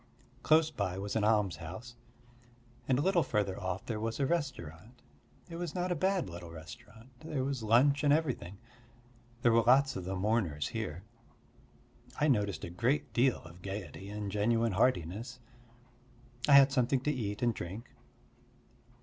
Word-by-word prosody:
Close 160 Hz, 0 st, +4 dB
by 95 Hz, -9 st, -2 dB
was 100 Hz, +1 st, -4 dB
an 110 Hz, -, +1 dB
almshouse, 105 Hz, +1 st, -1 dB, 0.9 s
and 130 Hz, -, +3 dB
a 145 Hz, -, +1 dB
little 185 Hz, -1 st, +3 dB
further 105 Hz, -8 st, -1 dB
off 95 Hz, 0 st, -3 dB
there 110 Hz, -2 st, -3 dB
was 115 Hz, +3 st, -3 dB
a 140 Hz, -, +2 dB
restaurant. 125 Hz, -, -4 dB, 0.4 s
It 165 Hz, -1 st, -7 dB
was 170 Hz, -3 st, -5 dB
not 180 Hz, 0 st, -1 dB
a -, -, +1 dB
bad 190 Hz, +2 st, +1 dB
little 85 Hz, 0 st, -8 dB
restaurant: 95 Hz, +9 st, -12 dB
there 155 Hz, -4 st, -3 dB
was 135 Hz, -2 st, -2 dB
lunch 130 Hz, +7 st, +4 dB
and 145 Hz, -, +4 dB
everything. 130 Hz, -, 0 dB, 0.9 s
There 120 Hz, -, +5 dB
were 115 Hz, 0 st, +5 dB
lots 135 Hz, +3 st, +4 dB
of 90 Hz, -, -5 dB
the 95 Hz, +1 st, -3 dB
mourners 95 Hz, -7 st, 0 dB
here. 80 Hz, +5 st, -5 dB, 1.2 s
I 150 Hz, -, +3 dB
noticed 105 Hz, -6 st, 0 dB
a 85 Hz, -, -5 dB
great 120 Hz, +11 st, 0 dB
deal 125 Hz, +1 st, +2 dB
of 85 Hz, +3 st, -13 dB
gaiety 95 Hz, -1 st, -6 dB
and 105 Hz, -1 st, -4 dB
genuine 115 Hz, +3 st, +1 dB
heartiness. 110 Hz, +3 st, 0 dB, 1.1 s
I 145 Hz, -, +6 dB
had 140 Hz, 0 st, +8 dB
something 130 Hz, -1 st, +1 dB
to 150 Hz, -, 0 dB
eat 105 Hz, -2 st, -3 dB
and 120 Hz, -1 st, +3 dB
drink. 105 Hz, +6 st, -7 dB
115 Hz, 160 wpm, -32 LUFS, 95-135 Hz, 1.2 s, had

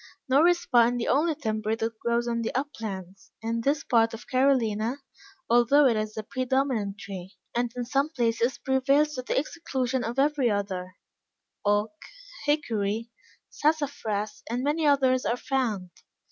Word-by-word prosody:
Nor 280 Hz, +6 st, +5 dB
is 350 Hz, -1 st, +2 dB
pine 240 Hz, -1 st, +4 dB
the 235 Hz, -, -2 dB
only 305 Hz, +4 st, +2 dB
timber 220 Hz, -5 st, -1 dB
that 225 Hz, 0 st, -3 dB
grows 235 Hz, 0 st, 0 dB
on 235 Hz, -1 st, -1 dB
the 225 Hz, -, -2 dB
uplands, 200 Hz, -, -5 dB
in 230 Hz, +1 st, -1 dB
this 280 Hz, +4 st, +1 dB
part 230 Hz, -1 st, +2 dB
of 225 Hz, -, -12 dB
Carolina, 250 Hz, -4 st, +2 dB, 0.5 s
although 240 Hz, +5 st, +5 dB
it 245 Hz, -4 st, +4 dB
is 215 Hz, 0 st, -3 dB
the 220 Hz, -, -4 dB
predominant 255 Hz, -4 st, -1 dB
tree, 190 Hz, -2 st, -8 dB, 0.2 s
and 240 Hz, 0 st, 0 dB
in 245 Hz, -1 st, -3 dB
some 275 Hz, +4 st, +1 dB
places 235 Hz, -3 st, 0 dB
prevails 275 Hz, +3 st, +2 dB
to 255 Hz, -, -3 dB
the 250 Hz, -, -2 dB
exclusion 265 Hz, -4 st, -1 dB
of 235 Hz, +3 st, -4 dB
every 280 Hz, -2 st, +2 dB
other 190 Hz, -3 st, -3 dB, 0.7 s
oak, 205 Hz, +4 st, +1 dB, 0.5 s
hickory, 230 Hz, -6 st, 0 dB, 0.4 s
sassafras, 285 Hz, -9 st, -1 dB
and 245 Hz, +2 st, -2 dB
many 300 Hz, +2 st, +1 dB
others 260 Hz, -3 st, +3 dB
are 235 Hz, -, 0 dB
found. 230 Hz, -10 st, -2 dB
240 Hz, 150 wpm, -27 LUFS, 220-275 Hz, 0.7 s, Nor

